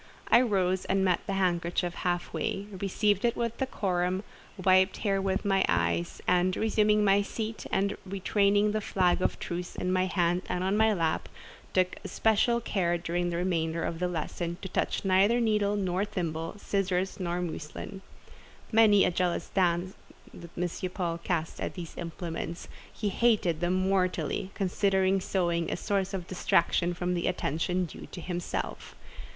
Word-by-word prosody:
I 235 - +7
rose 190 -6 +1
and 195 0 +1
met 180 -2 +3
the 200 - -1
handkerchief 175 -2 0
half 175 0 -2
way, 200 - -2
received 200 +1 0
it 235 -1 +2
with 235 -1 -2
decorum, 185 -7 -1 0.3
wiped 185 +1 +3
therewith 195 -1 0
my 195 -1 +3
eyes, 170 0 0
and, 180 +1 +3
resuming 210 -1 +3
my 200 0 +5
seat, 220 +2 -5
and 200 +1 +1
retaining 200 +2 +2
the 215 0 -1
flag 185 -2 +1
of - - 0
truce 175 +1 -5
in 180 0 -1
my 185 0 +2
hand 175 -1 +1
and 180 - -1
on 190 +2 +1
my 220 +1 +4
lap, 165 -6 0 0.5
took 185 -1 +2
especial 225 +2 +2
care 180 -6 0
during 175 +1 -1
the 170 - -2
remainder 165 -2 0
of 165 - -3
the 180 - +1
lesson 170 0 -3
to 190 - -4
touch 190 - -1
neither 195 +5 +4
needle 210 -3 +2
nor 190 -1 0
thimble, 165 -5 -3
scissors 190 -2 -1
nor 175 -1 -1
muslin. 175 +3 -6 0.7
Many 215 -3 +6
a - - +2
jealous 175 0 -1
glance 180 0 +1 0.4
did 170 -1 -10
M. 180 +1 -2
Paul 170 -3 -2
cast 170 -1 -2
at - - -3
these 175 -3 -7
implements; 170 0 -5 0.2
he 210 - -2
hated 200 -7 +2
them 175 +1 +1
mortally, 185 0 0
considering 190 0 +2
sewing 170 -3 0
a - - -1
source 195 -1 -1
of 190 -3 -4
distraction 175 -1 +1
from 180 +1 -1
the 175 -1 -1
attention 180 +1 0
due 165 - -10
to - - -9
himself. 175 0 -4
185 Hz, 160 wpm, -29 LUFS, 175-200 Hz, 0.7 s, I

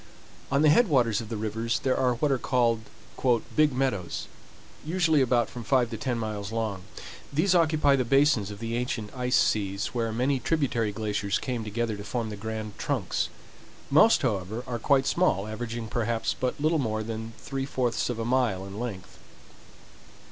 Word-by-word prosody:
On 140 +2 +3
the 155 - +6
head 240 +8 +5
waters 120 - +2
of 110 - -9
the 115 - -3
rivers 110 +2 -1
there 130 -1 0
are 125 -2 +2
what 145 +4 +1
are 135 - +1
called 120 -3 +2 0.8
"Big 155 -1 +4
Meadows," 125 -9 -2 0.6
usually 160 -2 +2
about 120 -2 +2
from 120 - -8
five 125 0 +2
to 115 - -4
ten 120 +2 -2
miles 105 -2 -4
long. 110 -4 -2 0.5
These 160 +7 +2
occupy 155 -4 +4
the 130 - +1
basins 135 -4 +3
of 105 - -7
the 115 +2 -3
ancient 120 -3 -3
ice 125 0 0
seas, 100 -1 +1
where 115 -2 -1
many 130 +4 +1
tributary 125 -5 0
glaciers 105 -1 -1
came 125 -3 -3
together 110 +1 -2
to 100 - -7
form 115 0 -3
the - - -5
grand 110 0 -6
trunks. - - -1 0.6
Most, 155 +9 +6
however, 110 -1 -1
are 120 -2 -4
quite 135 +3 +3
small, 115 - +2
averaging 115 +1 -5
perhaps 115 0 -1
but 130 +2 -2
little 155 +2 +2
more 110 -4 -1
than 115 0 -5
three 135 -1 -4
fourths 125 -4 -1
of 120 - -2
a 115 - -3
mile 120 -6 +1
in 100 +2 -8
length. 105 -7 -6
120 Hz, 175 wpm, -27 LUFS, 110-135 Hz, 0.8 s, the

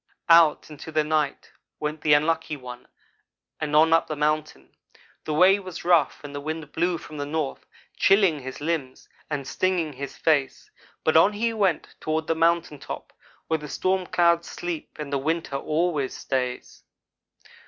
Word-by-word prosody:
"Out 165 -2 +5
into 150 +2 -9
the 155 0 +2
night 150 -2 -1 0.3
went 150 +1 -3
the 150 -1 +5
Unlucky 160 0 0
one 125 -2 -10 0.7
and 150 -1 -2
on 160 +2 +6
up 165 - +3
the 155 - -3
mountain. 150 - -2 0.5
The 155 - -2
way 190 +5 +6
was 185 -4 -8
rough 170 -5 +3
and 145 -1 -8
the 145 - -5
wind 155 0 -5
blew 175 +1 0
from 155 -1 -10
the 145 - -3
north, 150 -2 -3 0.3
chilling 195 -6 +4
his 130 -1 -8
limbs 145 -4 -3 0.2
and 140 -3 -3
stinging 170 0 0
his 140 +1 -7
face, 145 -5 0 0.3
but 160 - +2
on 180 +6 +6
he 230 +2 -1
went 195 -7 0
toward 155 0 -1
the 165 - +1
mountain 165 -2 +1
top, - - -8 0.3
where 160 -1 0
the 150 0 -8
stormclouds 175 -1 +1
sleep 175 -3 -6
and 150 -2 -6
the 140 - +1
winter 160 0 -2
always 155 -2 -1
stays. 125 -2 -3
155 Hz, 165 wpm, -25 LUFS, 145-170 Hz, 0.7 s, on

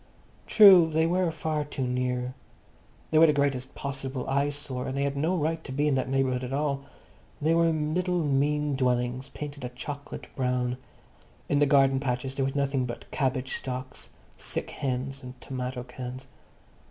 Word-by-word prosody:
True, 190 -6 +8
they 160 +1 +2
were 180 +1 +2
far 155 -1 -2
too 140 -3 -4
near. 125 0 -1 0.8
They 155 - +5
were 165 - +8
the 150 - +4
greatest 135 -3 -1
possible 135 -2 -4
eyesore, 140 -2 -1
and 130 - -3
they 140 - +1
had 140 0 -1
no 160 +6 +1
right 160 +1 -1
to - - -8
be 145 +3 +1
in 150 - +3
that 130 -1 0
neighbourhood 130 -1 +1
at 125 - -5
all. 140 0 -1 0.6
They 155 +2 +2
were 165 0 +4
little 165 +3 0
mean 145 +1 +1
dwellings 125 0 0
painted 145 -2 -7
a 125 - -3
chocolate 140 +3 -7
brown. 125 -1 0 0.7
In 145 - +3
the 145 - +4
garden 135 -1 +4
patches 130 0 -2
there 135 -1 0
was 135 - -3
nothing 135 -2 +1
but 120 - -8
cabbage 130 -2 -1
stalks, 130 0 -6 0.3
sick - - -4
hens 135 +1 -3
and 125 -1 -10
tomato 125 -1 -4
cans. 125 +1 -7
135 Hz, 170 wpm, -27 LUFS, 130-150 Hz, 0.8 s, True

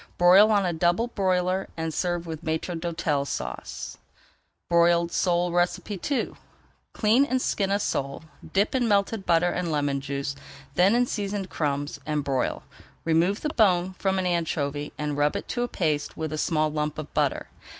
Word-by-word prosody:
Broil 185 +4 +7
on 205 -3 +3
a 175 - 0
double 175 +8 +1
broiler 185 -2 0
and 160 -1 -2
serve 175 0 -1
with 160 -2 -6
Maître 160 +2 -2
d'Hôtel 165 -4 -1
Sauce. - - -5 0.7
BROILED 170 0 +3
SOLE 175 -1 +1
II 190 +8 -1 0.6
Clean 225 +5 +3
and 260 -2 0
skin 200 -5 0
a 200 - +2
sole, 140 -7 -2 0.3
dip 200 +2 +2
in 250 -3 +1
melted 200 0 +1
butter 175 +1 +3
and 180 -2 -2
lemon 145 -2 0
juice, 140 0 -3 0.4
then 185 +8 +4
in 245 +1 +3
seasoned 200 -4 -3
crumbs, 145 -1 -2
and 150 0 -1
broil. 135 -2 -1 0.4
Remove 165 +5 +2
the 300 - -1
bone 185 -8 +2
from 190 -1 +1
an 185 - 0
anchovy 155 -4 -1
and 150 -1 -2
rub 145 0 +2
it - - -4
to 240 - -1
a 245 - 0
paste 155 -9 -1
with 160 -1 -3
a - - -2
small 155 -2 +1
lump 150 0 -2
of 155 -1 -7
butter. - - 0
175 Hz, 170 wpm, -26 LUFS, 155-195 Hz, 0.7 s, Broil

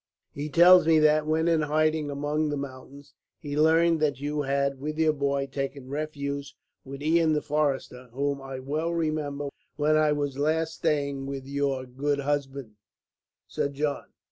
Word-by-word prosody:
He 145 +2 -5
tells 175 +3 +7
me 160 -1 +5
that, 155 0 +3
when 160 +1 +1
in 165 -2 +3
hiding 155 0 +1
among 145 +2 -1
the 145 - -2
mountains, 140 +1 -9 0.2
he 145 -3 -6
learned 160 +2 +4
that 145 -4 0
you 145 +1 -2
had, 140 -1 0
with 150 +2 -4
your 160 -1 +3
boy, 140 -1 -1
taken 135 -1 -5
refuge 140 -1 -4 0.3
with 140 +1 -8
Ian 160 0 +3
the 150 - +1
forester, 140 -4 -2
whom 140 +2 -2
I 135 0 -7
well 155 +5 -2
remember 155 -3 -2 0.3
when 155 +1 +2
I 155 -1 +3
was 145 -2 -3
last 160 +2 0
staying 140 -4 -1
with 135 -1 -5
your 140 -1 -1
good 140 +3 -2
husband, 140 -5 -3 0.7
Sir 140 - -2
John. 145 +1 -2
145 Hz, 165 wpm, -27 LUFS, 140-155 Hz, 0.7 s, tells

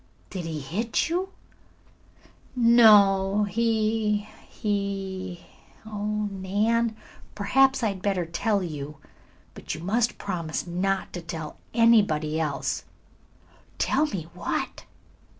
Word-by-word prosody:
"Did 180 -3 -4
he 160 -2 -4
hit 210 - -1
you?" 365 +3 -1 1.3
"No, 210 -4 +6
he 215 0 0 0.2
he 195 -3 -3 0.4
oh, 210 0 -2
Nan, 215 +4 0 0.4
perhaps 265 +5 +3
I 220 - +3
had 195 -2 -5
better 190 -3 0
tell 200 +4 0
you. 150 -3 -6 0.6
But - - -6
you 160 - -9
must 225 +5 +1
promise 170 -5 -3
not 190 +2 -1
to 175 - -5
tell 165 -2 -6 0.2
anybody 200 -10 +4
else." 150 -3 -2 0.9
"Tell 305 - +2
me 190 - -4
what?" - - -3
200 Hz, 105 wpm, -26 LUFS, 175-220 Hz, 1.3 s, No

